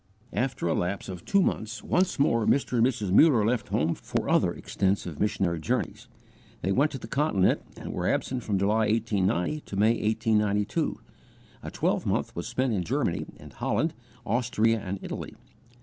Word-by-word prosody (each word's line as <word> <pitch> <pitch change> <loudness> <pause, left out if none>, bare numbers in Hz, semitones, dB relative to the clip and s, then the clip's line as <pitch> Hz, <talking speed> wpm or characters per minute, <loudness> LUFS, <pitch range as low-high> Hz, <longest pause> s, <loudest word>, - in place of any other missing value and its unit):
After 125 -7 -1
a 80 - +2
lapse 95 +3 -2
of 90 -2 -7
two 200 -1 +3
months, 115 -3 -2
once 185 +1 +1
more 115 -6 +2
Mr. 130 -3 +2
and 115 - +5
Mrs. 110 -7 -2
Muller 120 - +6
left 120 +2 0
home 80 +3 +1
for - - -3
other - - +3
extensive 95 -5 -2
missionary 95 -5 0
journeys. 80 - -2 0.6
They 95 - +1
went 140 +9 +3
to - - -3
the 115 - -9
Continent 115 -8 +2 0.2
and - - -6
were - - -2
absent 130 -1 0
from 105 -3 -1
July, 105 +3 +2
1890, 105 - 0
to 100 - -8
May, 105 +3 +4
1892. 105 -2 0 0.6
A - - -6
twelvemonth - - -1
was - - -4
spent 130 -2 0
in 95 -4 0
Germany - - -1
and - - -13
Holland, 160 0 0 0.3
Austria 115 -1 +1
and 100 0 -3
Italy. - - -6
110 Hz, 165 wpm, -27 LUFS, 95-125 Hz, 0.6 s, Muller